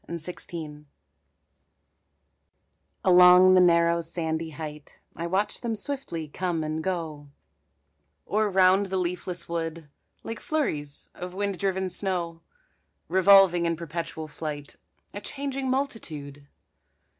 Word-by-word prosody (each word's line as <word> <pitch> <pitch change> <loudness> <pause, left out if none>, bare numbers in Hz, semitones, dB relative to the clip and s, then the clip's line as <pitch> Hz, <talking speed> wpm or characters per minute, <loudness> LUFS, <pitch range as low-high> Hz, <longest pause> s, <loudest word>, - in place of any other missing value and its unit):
SNOWBIRDS 160 -2 -7 2.2
Along 180 0 +8
the 185 - +6
narrow 170 -1 +4
sandy 160 -1 -3
height 150 -1 -9 0.2
I 170 +1 -4
watch 200 +4 -1
them 230 -2 -2
swiftly 210 - -3
come 170 +1 -2
and 155 +1 -3
go, 160 -5 -4 1.0
Or 215 0 +1
round 190 +1 +4
the 190 0 -2
leafless 180 0 -3
wood, 165 -2 -4 0.3
Like 225 -1 -6
flurries 150 - -3
of 180 0 -8
wind 200 -1 -2
driven 190 -1 0
snow, 175 -3 -3 0.7
Revolving 190 -2 +6
in 170 - 0
perpetual 165 -1 -5
flight, 150 -2 -6 0.4
A 205 - -6
changing 275 +2 -4
multitude. 155 - -4
175 Hz, 110 wpm, -26 LUFS, 160-190 Hz, 2.2 s, Along